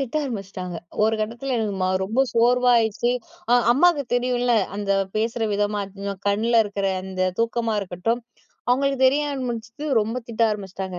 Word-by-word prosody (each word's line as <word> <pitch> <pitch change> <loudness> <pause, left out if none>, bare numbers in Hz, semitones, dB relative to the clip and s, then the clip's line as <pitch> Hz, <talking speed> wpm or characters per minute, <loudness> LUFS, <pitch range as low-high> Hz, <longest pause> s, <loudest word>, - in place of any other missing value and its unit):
திட்ட 270 -1 -4
ஆரம்பிச்சிட்டாங்க. 195 -7 -5 0.3
ஒரு 220 +1 +3
கட்டத்தில 235 +5 -3
எனக்கு 215 -3 -1
ம் - - +3 0.2
ரொம்ப 220 +7 0
சோர்வாயிருச்சு. 240 -1 +3 0.4
அ - - +6 0.2
அம்மாக்கு 300 +3 +4
தெரியும்ல 245 0 +1 0.2
அந்த 205 -1 -3 0.3
பேசுற 225 +2 -1
விதமா, 205 0 0 0.5
கண்ல 215 +4 +1
இருக்குற 200 -1 -2 0.2
அந்த 190 -1 -3 0.2
தூக்கமா 230 0 0
இருக்கட்டும், 195 +5 -2 0.5
அவங்களுக்கு 275 +2 +2
தெரிய 280 +3 +3
ஆரம்பிச்சிட்டு. 245 +1 -5
ரொம்ப 220 +3 -2
திட்ட 230 0 -1
ஆரம்பிச்சுட்டாங்க. 190 -3 -5
230 Hz, 135 wpm, -23 LUFS, 205-245 Hz, 0.5 s, அ